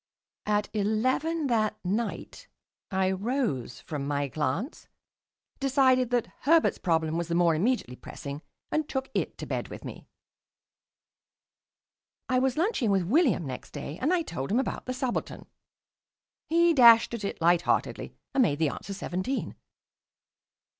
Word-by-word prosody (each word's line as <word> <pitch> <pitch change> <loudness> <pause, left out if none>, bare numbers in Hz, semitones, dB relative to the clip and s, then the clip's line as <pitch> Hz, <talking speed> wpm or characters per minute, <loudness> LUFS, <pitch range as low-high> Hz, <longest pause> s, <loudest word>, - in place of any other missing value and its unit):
At 210 0 +1
eleven 255 +10 0
that 215 -4 +1
night 230 - -3 0.4
I 190 -1 +1
rose 195 - -2
from 145 -3 -5
my 145 -1 -1
glance, 155 - -3 0.7
decided 260 -2 +3
that 245 -2 +1
Herbert's 325 +3 +3
problem 160 -2 0
was 170 - -3
the 170 - -1
more 170 -1 +4
immediately 180 - 0
pressing, 140 +3 -8 0.3
and 310 -1 -1
took 265 0 -3
it - - -2
to - - -6
bed - - -3
with - - -9
me. - - -9 2.2
I 255 -1 +2
was 260 0 0
lunching 330 - +1
with 195 -2 +2
William 240 - +2
next 130 -2 -7
day, 150 +4 -6
and 285 +6 +2
I 360 -2 +2
told 135 - -5
him 235 - +3
about 265 - -3
the 255 - -1
subaltern. 255 -1 -3 1.0
He 335 +1 +4
dashed 235 -4 +7
at 230 -3 -4
it 200 - -4
lightheartedly 175 +1 +1 0.2
and 270 - +3
made 150 - +2
the 160 -1 +2
answer 195 +7 -6
seventeen. 190 +7 -3
220 Hz, 140 wpm, -28 LUFS, 170-265 Hz, 2.2 s, dashed